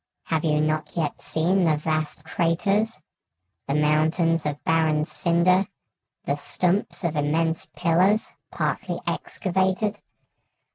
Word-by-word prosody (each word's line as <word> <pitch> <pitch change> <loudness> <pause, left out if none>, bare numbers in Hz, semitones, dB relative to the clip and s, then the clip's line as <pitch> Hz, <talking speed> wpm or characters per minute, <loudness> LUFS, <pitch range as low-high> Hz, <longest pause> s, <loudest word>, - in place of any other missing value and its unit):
Have 160 -2 -1
you 150 -2 +2
not 155 +2 -1
yet 155 -3 -2
seen 180 +4 +1
the 155 -2 +3
vast 155 0 -2
craters, 195 +5 0 0.7
the 140 - 0
mountains 155 +2 +2
of 145 -1 -4
barren 160 -2 +2
cinder, 180 +3 +2 0.6
the 140 - -1
stumps 180 +7 -1
of 170 -2 -1
immense 160 +2 0
pillars, 185 +5 +2 0.2
partly - - -2
excavated? 190 +2 -1
165 Hz, 110 wpm, -24 LUFS, 155-185 Hz, 0.7 s, the